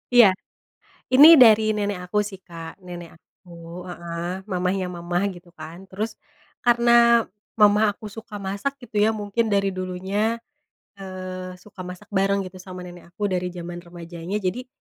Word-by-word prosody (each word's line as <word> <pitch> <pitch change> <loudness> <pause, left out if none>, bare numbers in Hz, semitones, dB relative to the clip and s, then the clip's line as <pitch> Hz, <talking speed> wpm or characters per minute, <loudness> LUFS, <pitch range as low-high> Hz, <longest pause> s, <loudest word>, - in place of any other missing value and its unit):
Iya. 220 -6 +9 0.8
Ini 295 +5 +9
dari 220 -3 +7
nenek 200 -4 -3
aku, 210 +1 +1
sih, 195 -2 -8
Kak. 165 +1 -10
Nenek 175 -2 -9
aku, 170 0 -12
heeh, 170 +1 -5
mamanya 185 0 -1
mama, 175 +1 -2
gitu, 175 -1 -12
kan. 165 +3 -10
Terus, 215 +4 -5 0.5
karena 235 0 +5 0.4
mama 210 0 +5
aku 215 +1 -10
suka 210 -1 -9
masak, 200 +8 -2
gitu, 225 -3 -7
ya, 215 +2 +4
mungkin 215 +2 -1
dari 195 0 +2
dulunya, 190 +5 -2 0.6
eee, 185 -1 -7
suka 185 +1 -18
masak 185 +3 -10
bareng, 195 0 +1
gitu, 185 0 -10
sama 185 -1 -9
nenek 175 -1 -11
aku 205 -2 -1
dari 180 0 0
zaman 175 0 -6
remajanya, 170 +1 -7
jadi, 210 +6 -3
190 Hz, 150 wpm, -23 LUFS, 180-210 Hz, 0.8 s, Iya